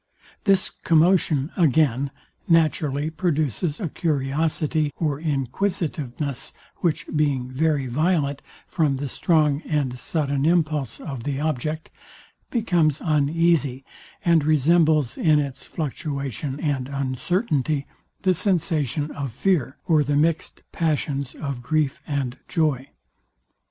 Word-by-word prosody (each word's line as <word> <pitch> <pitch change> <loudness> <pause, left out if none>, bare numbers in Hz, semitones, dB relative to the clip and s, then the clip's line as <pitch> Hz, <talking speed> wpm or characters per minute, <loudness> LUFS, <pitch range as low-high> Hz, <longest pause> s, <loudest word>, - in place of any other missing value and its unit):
This 195 -2 +3
commotion, 165 -3 +2
again, 140 -5 +3 0.4
naturally 155 -3 +2
produces 155 - -1
a 190 - -2
curiosity 155 +1 0
or 150 -4 -1
inquisitiveness, 150 -2 -2 0.2
which 165 -3 0
being 140 -4 +1
very 145 0 +1
violent, 145 +1 0 0.2
from 155 -5 +1
the 140 +2 -3
strong 150 0 +2
and 140 -6 -1
sudden 140 -3 -1
impulse 155 -5 +1
of 135 -6 -6
the 140 0 -2
object, 155 +1 -2 0.6
becomes 175 - +2
uneasy, 150 -3 +1 0.4
and 170 -3 +4
resembles 155 -2 +3
in 155 -2 +4
its 140 -2 -4
fluctuation 140 - -4
and 140 -5 -1
uncertainty, 140 - 0 0.4
the 185 -1 +4
sensation 160 - 0
of 140 -3 -4
fear 140 - 0
or 155 -4 +4
the 145 +1 0
mixed 160 +2 0
passions 145 -4 -1
of 140 -5 -4
grief 150 +1 0
and 135 -4 -2
joy. 145 -5 0
150 Hz, 110 wpm, -24 LUFS, 140-160 Hz, 0.6 s, and